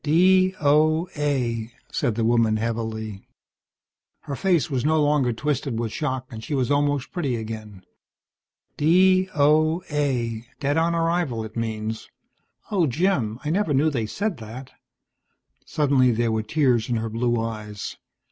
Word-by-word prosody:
"D.O.A.," 155 -7 +2 0.2
said 120 -7 0
the 115 0 0
woman 115 -2 +3
heavily. 110 -2 -3 1.0
Her 140 -3 -5
face 175 -1 +2
was 130 -6 -2
no 155 +2 +2
longer 145 -4 +2
twisted 135 0 -2
with 115 -1 -2
shock, 130 -3 -2
and 110 -1 -8
she 145 - -3
was 130 0 0
almost 145 -1 +1
pretty 145 -9 -1
again. 110 -3 -7 0.9
"D.O.A. 150 -8 +2
Dead 145 0 0
on 165 +1 +2
arrival, 165 -9 0
it 110 - -11
means. 110 -1 -4 0.6
Oh, 185 -6 +2
Jim, 135 - 0
I 150 - 0
never 175 -5 +1
knew 155 +4 +3
they 115 -6 -2
said 200 - -2
that." 120 +3 -9 1.0
Suddenly 135 -4 +3
there 115 0 0
were 110 0 0
tears 120 -1 +1
in 120 - +1
her 115 0 -2
blue 120 +1 0
eyes. 110 -3 -5
135 Hz, 135 wpm, -24 LUFS, 115-155 Hz, 1.0 s, woman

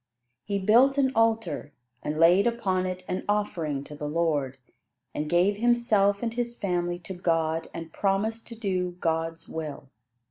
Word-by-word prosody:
He 200 - -1
built 240 +8 +4
an 265 -2 +3
altar, 225 -9 0 0.3
and 150 +1 -3
laid 175 +6 +5
upon 190 -6 0
it 185 0 -5
an 185 - -2
offering 165 -9 -1
to 150 - -11
the 150 0 -5
Lord, 150 -5 0 0.6
and 150 0 -3
gave 180 +5 +3
himself 220 -3 +2
and 230 -1 -1
his 240 0 -3
family 175 -2 -1
to 180 +2 -8
God 165 -2 0
and 165 -1 -8
promised 210 +3 -1
to 235 - -8
do 185 -5 -2
God's 165 0 -2
will. 150 -4 -6
185 Hz, 155 wpm, -27 LUFS, 165-220 Hz, 0.6 s, laid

